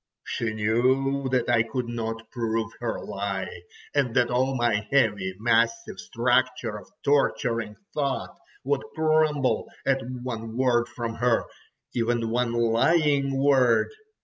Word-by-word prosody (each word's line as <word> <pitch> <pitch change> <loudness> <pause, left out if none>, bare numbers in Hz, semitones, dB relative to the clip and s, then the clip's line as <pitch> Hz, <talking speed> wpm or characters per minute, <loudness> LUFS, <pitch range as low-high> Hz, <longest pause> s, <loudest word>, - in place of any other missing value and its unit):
She 115 -1 -2
knew 130 +5 +1
that 125 -2 +1
I 120 -2 +4
could 115 +2 -3
not 115 -1 -5
prove 115 -2 -2
her 120 -1 -2
lie, 95 -3 -4 0.3
and 135 -5 +1
that 125 0 +3
all 130 +2 +1
my 120 -4 +1
heavy 105 -9 +2
massive 115 +1 +1
structure 125 -2 0
of 95 - -16
torturing 115 -6 +1 0.2
thought 140 -3 -2 0.3
would 140 0 0
crumble 155 -3 +2 0.2
at 135 -1 +2 0.2
one 115 -2 -5
word 120 -2 +2
from 115 -2 -4
her, 120 -1 +2 0.5
even 115 -1 0
one 120 0 +1
lying 135 +4 +2
word. 135 -4 +4
120 Hz, 125 wpm, -26 LUFS, 115-135 Hz, 0.5 s, I